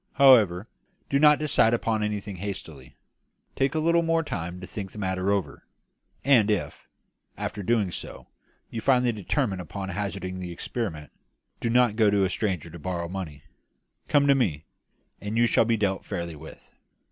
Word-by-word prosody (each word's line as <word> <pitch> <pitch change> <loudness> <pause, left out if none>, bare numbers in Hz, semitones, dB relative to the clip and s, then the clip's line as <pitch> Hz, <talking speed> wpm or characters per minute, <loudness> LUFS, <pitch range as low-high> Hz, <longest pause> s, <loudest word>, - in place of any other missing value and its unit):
However, 110 -8 +5 0.4
do 140 - +3
not 150 0 +6
decide 130 -6 +3
upon 115 -2 -1
anything 105 -2 -3
hastily; 80 -8 -7 0.6
take 135 +2 0
a - - +2
little 170 +2 +3
more 165 0 +1
time 90 - -5
to 90 - -8
think 95 0 -6
the - - -12
matter 95 -1 -1
over; 95 -8 -3 0.6
and 120 -7 +5
if, 105 -4 -2 0.5
after 105 - -4
doing 105 -2 +1
so, - - -8 0.5
you 115 - -4
finally 125 -1 +3
determine 105 0 -1
upon 95 +3 -6
hazarding 95 -1 -4
the 90 -1 -5
experiment, 85 - -5 0.5
do 115 - -1
not 120 -2 +3
go 110 -3 +5
to 100 -1 +2
a 95 - 0
stranger 90 -7 -2
to 85 - -10
borrow 85 0 -3
money; 85 -7 -6 0.6
come 145 -1 +3
to 140 - +6
me, 90 - 0 0.6
and 105 +2 -3
you 120 - +5
shall 115 - +3
be 115 0 +1
dealt 100 -2 -1
fairly 85 -2 -5
with." 80 +2 -13
100 Hz, 170 wpm, -26 LUFS, 90-120 Hz, 0.6 s, not